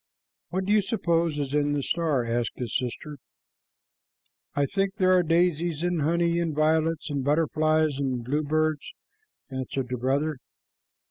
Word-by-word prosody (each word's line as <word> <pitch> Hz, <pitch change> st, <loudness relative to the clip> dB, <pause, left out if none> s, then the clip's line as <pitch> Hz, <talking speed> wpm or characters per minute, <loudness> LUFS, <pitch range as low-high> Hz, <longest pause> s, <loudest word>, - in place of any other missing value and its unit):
"What 190 Hz, +1 st, -2 dB
do 205 Hz, -, +2 dB
you 215 Hz, -, +5 dB
suppose 170 Hz, -6 st, 0 dB
is 140 Hz, -1 st, -3 dB
in 145 Hz, 0 st, +2 dB
the 145 Hz, -1 st, -1 dB
star?" 155 Hz, -7 st, 0 dB
asked 115 Hz, 0 st, -1 dB
the 125 Hz, -, -4 dB
sister. 130 Hz, +5 st, -4 dB, 1.4 s
"I 145 Hz, -, +2 dB
think 195 Hz, +4 st, -1 dB
there 185 Hz, -3 st, +4 dB
are 180 Hz, -, +5 dB
daisies 170 Hz, -1 st, +1 dB
and 175 Hz, -2 st, 0 dB
honey 170 Hz, +2 st, +1 dB
and 165 Hz, -3 st, -1 dB
violets 160 Hz, +1 st, +1 dB
and 140 Hz, -2 st, -1 dB
butterflies 155 Hz, 0 st, +2 dB
and 130 Hz, -4 st, -2 dB
bluebirds," 155 Hz, +2 st, -1 dB, 0.6 s
answered 130 Hz, 0 st, -3 dB
the 125 Hz, -, -2 dB
brother. 140 Hz, +4 st, 0 dB
155 Hz, 145 wpm, -26 LUFS, 140-170 Hz, 1.4 s, you